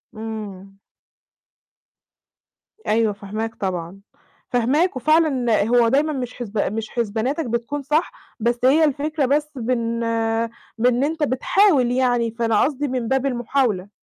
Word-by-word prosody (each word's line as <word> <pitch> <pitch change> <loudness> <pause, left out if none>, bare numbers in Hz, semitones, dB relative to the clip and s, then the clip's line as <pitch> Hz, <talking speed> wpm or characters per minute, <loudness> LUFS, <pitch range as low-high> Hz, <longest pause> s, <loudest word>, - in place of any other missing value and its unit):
إمم. 205 -3 -7 2.1
أيوه، 220 -1 +2
فاهماك 215 +3 -5
طبعًا. 185 -1 -4 0.5
فاهماك، 270 +9 +1
وفعلًا 260 -6 +2
هو 240 0 +4
دايمًا 290 +5 +2
مش 250 -3 -4
حسب 220 -3 -6 0.2
مش 220 0 -4
حسباناتك 235 +7 -2
بتكون 235 +5 -3
صح، 300 +5 0 0.3
بس 235 +2 0
هي 300 +5 +5
الفكرة 300 0 0
بس 295 +3 0
بن 235 -2 -1 0.8
بإن 245 +3 +2
أنت 315 +1 -1
بتحاول 280 0 +3
يعني، 245 -2 +1
فأنا 230 -2 +1
قصدي 290 +1 -1
من 250 -3 -2
باب 265 +2 +1
المحاولة. 240 -6 0
245 Hz, 120 wpm, -21 LUFS, 225-280 Hz, 2.1 s, هي